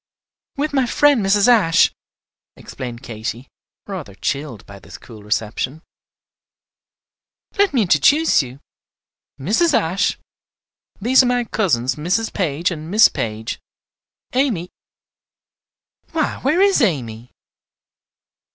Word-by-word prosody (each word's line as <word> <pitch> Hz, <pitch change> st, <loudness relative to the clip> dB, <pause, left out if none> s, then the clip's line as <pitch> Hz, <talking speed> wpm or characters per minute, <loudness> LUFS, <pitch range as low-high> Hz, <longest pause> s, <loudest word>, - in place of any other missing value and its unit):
"With 295 Hz, +1 st, -2 dB
my 265 Hz, -3 st, +1 dB
friend 285 Hz, -2 st, +3 dB
Mrs. 200 Hz, +3 st, +3 dB
Ashe," 210 Hz, -9 st, +4 dB, 0.6 s
explained 125 Hz, -1 st, -8 dB
Katy, 115 Hz, +2 st, -6 dB, 0.4 s
rather 175 Hz, -, -7 dB
chilled 140 Hz, -2 st, -4 dB
by 100 Hz, 0 st, -12 dB
this -, -, -12 dB
cool 110 Hz, -3 st, -14 dB
reception. 110 Hz, +8 st, -3 dB, 1.8 s
"Let 405 Hz, -1 st, +4 dB
me 250 Hz, -5 st, +2 dB
introduce 200 Hz, -, +3 dB
you. 130 Hz, +1 st, -10 dB, 0.8 s
Mrs. 240 Hz, -, +2 dB
Ashe, 185 Hz, +5 st, 0 dB, 0.8 s
these 250 Hz, +6 st, +5 dB
are 255 Hz, -, +1 dB
my 245 Hz, 0 st, +1 dB
cousins 155 Hz, -, -1 dB
Mrs. 180 Hz, +9 st, -1 dB
Page 170 Hz, -2 st, -1 dB
and 155 Hz, -1 st, -7 dB
Miss 215 Hz, +3 st, +6 dB
Page. 110 Hz, 0 st, -4 dB, 0.7 s
Amy, 240 Hz, -10 st, 0 dB, 1.4 s
why 315 Hz, -2 st, -1 dB
where 300 Hz, +7 st, +1 dB
is 395 Hz, -1 st, +4 dB
Amy?" 125 Hz, -, -1 dB
175 Hz, 105 wpm, -19 LUFS, -, 1.8 s, Miss